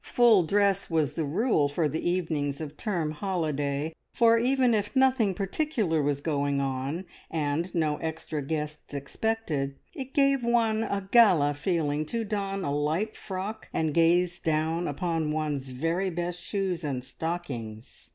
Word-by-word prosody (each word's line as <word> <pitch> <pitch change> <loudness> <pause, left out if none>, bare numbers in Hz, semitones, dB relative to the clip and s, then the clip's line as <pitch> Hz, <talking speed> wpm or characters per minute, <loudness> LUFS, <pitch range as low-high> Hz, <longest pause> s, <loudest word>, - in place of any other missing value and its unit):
Full 235 -5 +5
dress 200 +2 +2
was 160 -4 +1
the 160 - -1
rule 160 - +2
for 155 +2 +1
the 160 +4 -1
evenings 155 -6 -1
of 155 -2 -6
term 170 -5 -1
holiday, 155 -4 -2 0.2
for 230 -1 +5
even 255 0 +3
if 210 +3 -1
nothing 260 -7 +3
particular 200 - 0
was 140 -1 0
going 145 -2 0
on, 135 +6 -2 0.2
and 160 +2 -1
no 155 -3 +1
extra 160 -1 -4
guests 150 0 -4
expected, 140 -2 -2 0.2
it 270 -5 -7
gave 275 -2 +4
one 230 -2 +2
a 200 -3 -2
gala 180 -12 +6
feeling 155 -1 -1
to 230 +3 -2
don 195 -2 -2
a 140 - -1
light 155 +9 0
frock, 200 +3 -6
and 160 -2 0
gaze 175 +2 +3
down 160 +2 0
upon 165 0 -1
one's 150 -3 -2
very 165 +9 -1
best 175 0 -3
shoes 190 -4 -2
and 135 -4 -2
stockings. 130 -8 -6
165 Hz, 150 wpm, -28 LUFS, 145-200 Hz, 0.2 s, gala